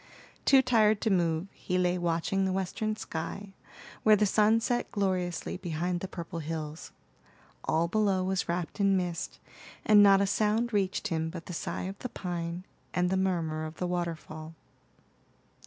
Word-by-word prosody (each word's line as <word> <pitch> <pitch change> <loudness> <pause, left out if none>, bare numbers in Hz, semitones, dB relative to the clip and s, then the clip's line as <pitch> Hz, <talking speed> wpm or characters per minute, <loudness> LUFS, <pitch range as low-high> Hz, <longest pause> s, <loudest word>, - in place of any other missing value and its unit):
Too 270 -1 +6
tired 220 -4 +4
to 220 - +1
move, 170 -2 +1
he 180 - -2
lay 180 0 +2
watching 175 +3 0
the 190 - +1
western 195 +3 -2
sky, 195 +1 -6 0.5
where 215 -1 +6
the 210 +1 +3
sun 215 +2 +4
set 240 +1 -1
gloriously 185 -5 -1
behind 175 0 -2
the 190 - -5
purple 170 -1 -6
hills. 155 -1 -5 0.7
All 165 +2 +2
below 195 -1 +1
was 190 -1 -1
wrapped 175 +3 -3
in 195 -1 +4
mist, 175 -2 -3 0.5
and 210 -1 +7
not 200 -1 +7
a 200 - +3
sound 215 +4 +1
reached 200 +1 0
him 160 -2 -1
but 165 -1 -8
the 180 - -7
sigh - - -3
of 195 +2 -6
the 250 - -5
pine, 175 -1 -4 0.3
and 180 0 +2
the - - +2
murmur 170 -5 0
of 155 +1 -6
the 180 - -3
waterfall. 165 -2 -4
185 Hz, 165 wpm, -29 LUFS, 170-200 Hz, 0.7 s, and